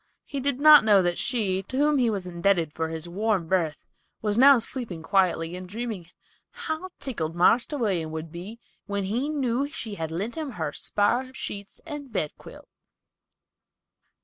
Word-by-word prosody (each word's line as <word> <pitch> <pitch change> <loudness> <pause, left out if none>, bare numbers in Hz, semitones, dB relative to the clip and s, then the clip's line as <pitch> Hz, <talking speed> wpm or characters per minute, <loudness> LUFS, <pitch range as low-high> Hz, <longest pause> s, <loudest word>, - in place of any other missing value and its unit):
He 280 - -4
did 270 -1 -1
not 300 -2 +9
know 205 -3 +5
that 175 0 0
she, 200 -7 0
to 230 +7 -6
whom 295 0 +3
he 240 -2 +3
was 200 -4 -3
indebted 170 -3 +1
for 160 0 -2
his 160 +1 -5
warm 200 0 0
berth, 165 -4 0 0.3
was 210 -1 -1
now 270 +3 +8
sleeping 230 -8 -4
quietly 180 -2 +1
and 180 0 -8
dreaming 215 -5 -5 0.4
"how 370 -7 -5
tickled 165 - -4
Marster 235 - +3
William 190 - 0
would 160 0 -6
be 190 +7 -8 0.3
when 200 -1 -2
he 235 +9 -1
knew 275 -2 0
she 230 -7 -6
had 160 -5 -4
lent 195 +9 -3
him 305 -5 -5
her 160 -6 -3
spare 245 +5 0
sheets 200 -1 -6
and 295 -5 -7
bedquilt!" 150 - -5
205 Hz, 165 wpm, -26 LUFS, 175-255 Hz, 0.4 s, not